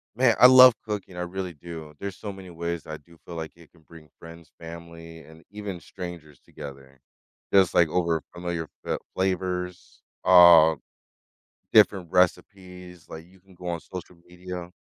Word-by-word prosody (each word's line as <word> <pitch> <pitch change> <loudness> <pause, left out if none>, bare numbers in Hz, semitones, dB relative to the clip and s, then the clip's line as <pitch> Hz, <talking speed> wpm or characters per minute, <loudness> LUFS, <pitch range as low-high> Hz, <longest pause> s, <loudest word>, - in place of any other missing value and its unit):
Man, 125 -1 +3
I 125 - +11
love 130 -1 +9
cooking, 100 -4 -6
I 90 - -5
really 90 0 -5
do. 80 0 -10
There's 100 -2 -6
so 100 -2 -7
many 95 -1 -12
ways 85 -1 -5
I 80 0 -7
do 85 +3 -22
feel 85 - -9
like 80 0 -7
it 85 -2 -19
can 85 - -24
bring 80 -1 -17
friends, 85 0 -14
family, 85 0 -11
and 80 +1 -17
even 100 -4 -7
strangers 85 -5 -10
together. 70 -1 -12 0.5
Just, 95 -3 +4
like, 85 - +4
over 85 -3 0
familiar 85 -2 -5 0.2
fa - - -2
uh, - - -4 0.2
flavors, 90 -1 -3 0.2
uh, 85 -3 +7 1.0
different 100 -5 +4
recipes, 90 -1 -2
like, 80 +1 -10
you 95 +1 -23
can 95 -1 -21
go 90 0 -10
on 85 -2 -3
social 90 -1 -10
media 90 0 -9
85 Hz, 165 wpm, -25 LUFS, 80-95 Hz, 1.0 s, I